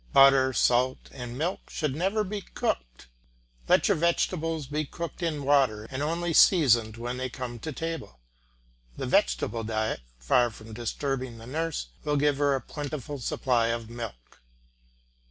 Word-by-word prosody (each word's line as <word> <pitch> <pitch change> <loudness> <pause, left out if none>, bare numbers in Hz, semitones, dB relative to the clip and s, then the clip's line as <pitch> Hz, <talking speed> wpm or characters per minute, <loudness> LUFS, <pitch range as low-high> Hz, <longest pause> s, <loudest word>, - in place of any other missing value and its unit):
Butter, 135 -1 +7
salt, 125 +1 +2
and 125 -2 -7
milk 170 +6 -3
should 150 -4 -2
never 195 +6 +1
be 205 +1 -4
cooked. - - -3 0.6
Let - - +4
your - - +3
vegetables 165 -1 0
be 150 +3 -2
cooked 170 +3 -6
in 155 -4 -1
water 130 -7 +3
and 130 +1 -3
only 165 +3 -1
seasoned 120 - +5
when 120 +2 -4
they 130 0 -2
come 120 -1 -6
to 155 - -5
table. 165 - -5 0.8
The - - -3
vegetable 65 - +1
diet, 110 - -1 0.2
far 120 - +3
from 110 0 -12
disturbing 125 +2 -3
the 115 - -11
nurse, 155 - -3
will 150 -1 +1
give 145 -1 +2
her 145 -1 +3
a 135 - -2
plentiful 145 -1 -5
supply 120 -1 +1
of 115 -1 -3
milk. 115 - -8
130 Hz, 155 wpm, -28 LUFS, 115-155 Hz, 0.8 s, Butter